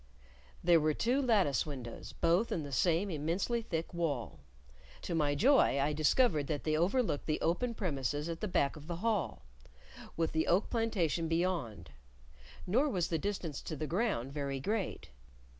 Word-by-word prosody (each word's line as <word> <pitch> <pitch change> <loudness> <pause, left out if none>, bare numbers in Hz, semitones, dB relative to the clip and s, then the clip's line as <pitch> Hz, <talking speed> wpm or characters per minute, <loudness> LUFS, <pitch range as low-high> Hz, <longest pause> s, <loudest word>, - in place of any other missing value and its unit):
There 170 -1 +6
were 155 -1 +1
two 250 +4 +1
lattice 200 - +3
windows, 130 -6 -7
both 175 +7 +1
in 160 - -1
the 145 - -7
same 175 +7 +1
immensely 170 +10 -1
thick 165 -5 -4
wall; 155 -8 -2 0.6
to - - -3
my 150 -3 +1
joy, 250 - +4
I 145 +2 +1
discovered 155 - +2
that 150 -2 -2
they 155 -1 +1
overlooked 185 - +1
the 155 - 0
open 230 +9 0
premises 145 - -2
at 165 -1 -5
the 215 - -1
back 140 -7 +1
of 150 0 -11
the 175 - -3
hall, 210 -9 0 0.7
with 165 -1 0
the 160 0 0
oak 185 +5 +2
plantation 185 - 0
beyond; 165 - -2 0.7
nor 255 +11 +2
was 180 -8 -1
the 165 - 0
distance 180 -6 -3
to 160 - -5
the 155 - -3
ground 165 - -1
very 140 -2 -3
great. 205 - -3
165 Hz, 165 wpm, -33 LUFS, 145-200 Hz, 0.7 s, There